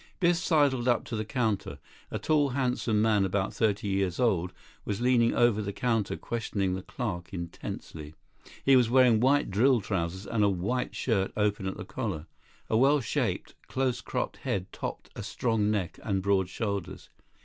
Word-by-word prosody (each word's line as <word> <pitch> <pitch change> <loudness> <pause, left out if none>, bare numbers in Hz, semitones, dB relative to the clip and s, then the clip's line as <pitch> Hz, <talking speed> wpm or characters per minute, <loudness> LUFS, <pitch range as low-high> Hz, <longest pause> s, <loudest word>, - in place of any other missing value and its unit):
Biff 175 -2 +3
sidled 145 -7 +2
up 120 -2 +3
to 115 - -4
the 110 - -1
counter. 110 - -1 0.3
A - - -3
tall, 150 -2 +2
handsome 125 -5 +1
man, 105 -3 +3
about 95 0 -1
thirty 105 -2 0
years 95 -2 0
old, 90 -8 +2 0.3
was 100 -2 -3
leaning 120 -1 +3
over 120 -3 +3
the 100 -1 -3
counter, 115 -1 -1
questioning 100 -5 -2
the 95 - -3
clerk 95 -5 -5
intensely. 80 -3 -7 0.5
He 135 - +6
was 125 -3 +4
wearing 125 -3 +5
white 135 -1 +3
drill 120 +6 +4
trousers 95 -1 -3
and 105 0 0
a 100 - +4
white 100 +7 -2
shirt 100 -6 0
open 105 -2 0
at 95 - -4
the - - -6
collar. 75 0 -4 0.4
A 110 - +2
well 140 +4 +5
shaped, 120 - -2
close 130 -2 -1
cropped - - -3
head 95 -1 -3
topped - - -6
a - - -5
strong 110 -4 0
neck 100 -5 -2
and 95 -3 -1
broad 95 -2 +2
shoulders. 100 -5 -4
110 Hz, 170 wpm, -28 LUFS, 95-125 Hz, 0.5 s, He